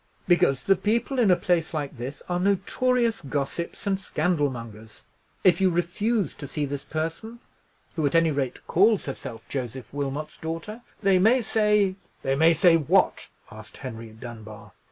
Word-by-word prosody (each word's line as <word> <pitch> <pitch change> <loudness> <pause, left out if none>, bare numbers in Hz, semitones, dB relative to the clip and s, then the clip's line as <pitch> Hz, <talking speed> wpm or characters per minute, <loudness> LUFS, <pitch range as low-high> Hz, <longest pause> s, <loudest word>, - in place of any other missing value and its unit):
"Because 175 -8 +3
the 195 - +4
people 230 +7 0
in 225 -5 +4
a 180 - +6
place 170 -2 0
like 145 -2 -3
this 130 +5 -6
are 175 0 -1
notorious 225 +5 +1
gossips 145 +6 -4
and 195 -1 0
scandal 160 -5 0
mongers. 110 -3 -10 0.4
If 180 -1 +4
you 190 - +5
refuse 180 - 0
to 145 - -8
see 150 +2 -2
this 140 0 -5
person, 165 +9 -4 0.6
who, 155 -3 +1
at 140 - -2
any 165 -1 +4
rate, 135 -3 -3
calls 205 +3 +3
herself 115 -5 -7
Joseph 130 -1 -5
Wilmot's 145 +1 -4
daughter, 165 +8 -5 0.2
they 195 -2 +4
may 235 +6 +4
say——" 210 -3 +2 0.3
"They 135 - +1
may 160 +4 +4
say 165 +1 +5
what?" 150 -5 +2 0.2
asked - - -12
Henry 115 0 -7
Dunbar. 110 -1 -10
165 Hz, 160 wpm, -25 LUFS, 135-195 Hz, 0.6 s, a